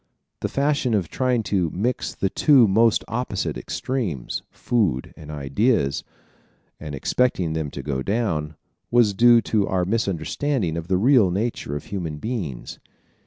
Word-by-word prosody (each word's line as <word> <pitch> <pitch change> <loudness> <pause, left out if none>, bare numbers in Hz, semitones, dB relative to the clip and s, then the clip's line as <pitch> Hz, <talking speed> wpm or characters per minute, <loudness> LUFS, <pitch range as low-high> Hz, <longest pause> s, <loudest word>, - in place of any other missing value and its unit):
The - - -2
fashion 140 -4 +1
of 95 -6 -1
trying 125 -3 0
to 95 -5 0
mix 115 +10 -2
the 95 - -1
two 135 -6 +5
most 110 +3 +3
opposite 115 -4 -2
extremes 105 - -3
food 95 - -1
and 75 -2 -12
ideas 75 - 0 0.8
and 75 -2 -6
expecting 90 - 0
them 80 -2 -2
to 70 - -7
go 65 -1 -2
down, 85 - -1 0.3
was 115 -4 +4
due 120 +3 +6
to 105 -3 0
our 90 -1 0
misunderstanding 100 - -1
of 85 0 -5
the 95 0 +2
real 115 -1 +5
nature 100 -6 -2
of 75 - -4
human 85 -7 -4
beings. 85 - -5
100 Hz, 145 wpm, -23 LUFS, 80-120 Hz, 0.8 s, due